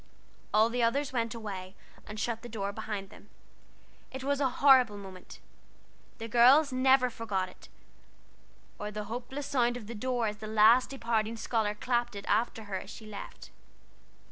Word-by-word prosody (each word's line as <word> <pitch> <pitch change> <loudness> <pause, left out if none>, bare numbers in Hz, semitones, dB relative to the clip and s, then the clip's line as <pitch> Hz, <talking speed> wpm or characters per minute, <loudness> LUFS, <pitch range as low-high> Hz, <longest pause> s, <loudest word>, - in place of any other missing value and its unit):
All 215 +2 +4
the 245 +1 -1
others 260 +4 +1
went 230 -1 -1
away, 195 -4 -7 0.3
and 215 +1 -7
shut 230 0 -2
the 240 - -9
door 200 -3 -3
behind 205 -2 -5
them. 210 - -16 0.8
It 265 0 -7
was 280 +1 0
a 270 - +3
horrible 255 -5 +5
moment: 190 -2 -11 0.8
the 225 - -6
girls 255 +5 +5
never 255 -1 +4
forgot 195 -5 -2
it, - - -17 1.1
or 210 - -4
the 210 0 -5
hopeless 245 +6 -6
sound 245 -3 +1
of 230 - -9
the 230 - -7
door 245 +1 -1
as 210 -1 -2
the 215 - -8
last 220 +4 +5
departing 230 -4 -1
scholar 220 -2 -1
clapped 240 0 -1
it 200 - -7
after 220 +1 0
her 200 -2 -4
as - - -11
she 220 - -10
left. 210 -2 -9
230 Hz, 170 wpm, -30 LUFS, 210-250 Hz, 1.1 s, horrible